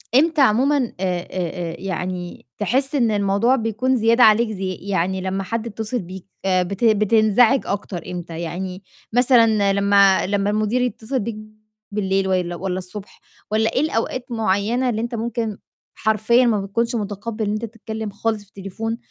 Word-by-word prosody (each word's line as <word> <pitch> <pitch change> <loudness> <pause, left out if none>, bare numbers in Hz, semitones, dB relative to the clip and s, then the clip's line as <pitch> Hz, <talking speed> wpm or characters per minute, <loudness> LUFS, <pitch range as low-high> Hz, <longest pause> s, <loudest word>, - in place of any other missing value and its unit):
إمتى 310 +2 +4
عمومًا 270 +4 +4
آآ 250 -4 -1 0.3
آآ - - -12
آآ 175 -2 -3
يعني 180 -4 -5
تحس 265 +7 0
إن 235 -5 +2
الموضوع 205 +4 +2
بيكون 230 +2 0
زيادة 230 +2 +4
عليك 220 +1 +5
ز 210 - -6 0.2
يعني 190 -1 -1
لمّا 190 +1 -2
حد 230 +3 -3
يتّصل 220 +2 -3
بيك، 185 -1 -9 0.2
آآ 185 -1 +3
بت 195 +4 -5
بتنزعج 220 +3 +4
أكتر 195 -3 -4
إمتى؟ 170 -2 -6
يعني 185 +3 -5 0.3
مثلًا 230 -5 +4
لمّا 200 -1 +4
لمّا 200 0 0
المدير 215 +4 0
يتّصل 250 +2 -2
بيك 225 0 -4 0.6
بالليل 195 -2 0
والّا 180 -2 0
والّا 185 +1 -3
الصبح 190 +2 -9 0.3
والّا 220 +1 +1
إيه - - +2
الأوقات 255 -3 -1
معيّنة 225 +3 0
اللي 220 -2 -1
أنت 235 +1 -3
ممكن 225 -2 -3 0.4
حرفيًا 220 +3 +3
ما 220 -4 +2
بتكونش 230 +5 -1
متقبّل 215 +1 -3
إن 205 - -1
أنت 215 +2 -2
تتكلِّم 220 -1 -6
خالص 215 +2 -2
في - - -23
التليفون 200 +4 -5
215 Hz, 160 wpm, -21 LUFS, 195-230 Hz, 0.6 s, عليك